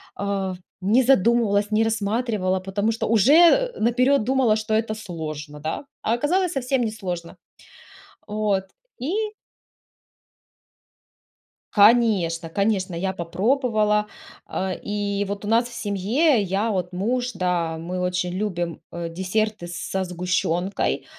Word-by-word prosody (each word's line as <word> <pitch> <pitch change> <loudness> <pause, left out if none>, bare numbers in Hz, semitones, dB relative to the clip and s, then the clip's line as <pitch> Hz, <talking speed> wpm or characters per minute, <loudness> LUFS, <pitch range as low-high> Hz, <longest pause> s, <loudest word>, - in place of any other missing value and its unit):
а, 195 -2 -2 0.3
не 215 +7 +3
задумывалась, 225 -4 +3
не 215 +1 +3
рассматривала, 215 -3 0
потому 200 +4 -1
что 225 - -2
уже 320 - +5
наперёд 250 +3 +3
думала, 255 -3 +3
что 215 0 -2
это 220 0 +1
сложно, 155 -7 -7
да? 160 - -4 0.2
А 225 - 0
оказалось 350 +8 +1
совсем 265 -1 0
несложно. 185 -6 -4 0.9
Вот, 210 -2 0 0.4
и 280 +9 -2 2.6
Конечно, 200 -7 +4
конечно, 195 -1 0
я 190 +3 -1
попробовала. 210 +3 +1 0.4
А, 190 0 -3
и 205 0 -2
вот 200 +1 -5
у - - -4
нас 230 +2 +3
в 240 - -12
семье, 220 - +1
я, 200 +4 0
вот 180 -2 -2
муж, 245 +7 -1
да, 180 -3 -1
мы 175 +3 -4
очень 180 0 -1
любим, 175 -4 -3
э, 170 0 -5
десерты 190 +2 -2
со 175 +2 -3
сгущёнкой. 180 +1 -1
205 Hz, 120 wpm, -23 LUFS, 180-230 Hz, 2.6 s, уже